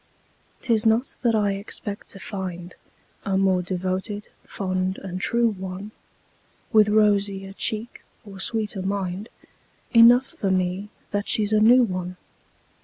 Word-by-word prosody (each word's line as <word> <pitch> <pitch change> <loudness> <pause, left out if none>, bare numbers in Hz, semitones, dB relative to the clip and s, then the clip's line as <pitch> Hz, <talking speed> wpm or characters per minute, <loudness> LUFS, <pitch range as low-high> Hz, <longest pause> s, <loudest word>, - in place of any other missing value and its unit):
'Tis 225 -3 +2
not 225 +3 +2
that 235 -3 +2
I 205 -2 +2
expect 200 +1 -6
to 195 - -7
find 180 -2 -6 0.5
A 195 -1 0
more 190 -1 +3
devoted, 185 +3 -3
fond 185 -1 -2
and 185 -1 -6
true 235 +3 +2
one, 190 0 -6 0.8
With 215 -1 +6
rosier 200 -2 +2
cheek 220 +3 -3 0.2
or 195 -2 -11
sweeter 210 -1 -2
mind 195 +1 -3 0.6
Enough 240 +2 +7
for 200 - -4
me 185 +2 -1 0.2
that 205 0 -2
she's 215 -1 +1
a 215 - +5
new 245 +4 +6
one. 185 -4 -3
200 Hz, 130 wpm, -24 LUFS, 185-215 Hz, 0.8 s, Enough